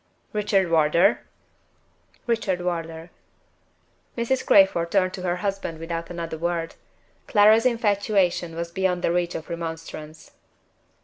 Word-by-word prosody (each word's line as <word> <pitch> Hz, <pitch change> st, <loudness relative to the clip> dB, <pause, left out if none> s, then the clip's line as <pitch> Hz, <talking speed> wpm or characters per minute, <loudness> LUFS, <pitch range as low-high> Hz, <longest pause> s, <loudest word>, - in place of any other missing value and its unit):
"Richard 200 Hz, -4 st, +1 dB
Wardour?" 160 Hz, +1 st, +4 dB, 1.1 s
"Richard 220 Hz, -6 st, 0 dB
Wardour." 165 Hz, -1 st, -4 dB, 1.1 s
Mrs. 245 Hz, +3 st, 0 dB
Crayford 190 Hz, -4 st, +4 dB
turned 185 Hz, 0 st, +1 dB
to 185 Hz, -, -6 dB
her 175 Hz, -1 st, -1 dB
husband 195 Hz, -3 st, -3 dB
without 165 Hz, +1 st, -5 dB
another 165 Hz, -2 st, -5 dB
word. 170 Hz, -1 st, -2 dB, 0.5 s
Clara's 215 Hz, +3 st, +5 dB
infatuation 200 Hz, -7 st, 0 dB
was 170 Hz, 0 st, -4 dB
beyond 180 Hz, -1 st, -1 dB
the -, -, +2 dB
reach 175 Hz, 0 st, -1 dB
of 160 Hz, -, -6 dB
remonstrance. 165 Hz, -2 st, -7 dB
175 Hz, 115 wpm, -24 LUFS, 165-200 Hz, 1.1 s, Clara's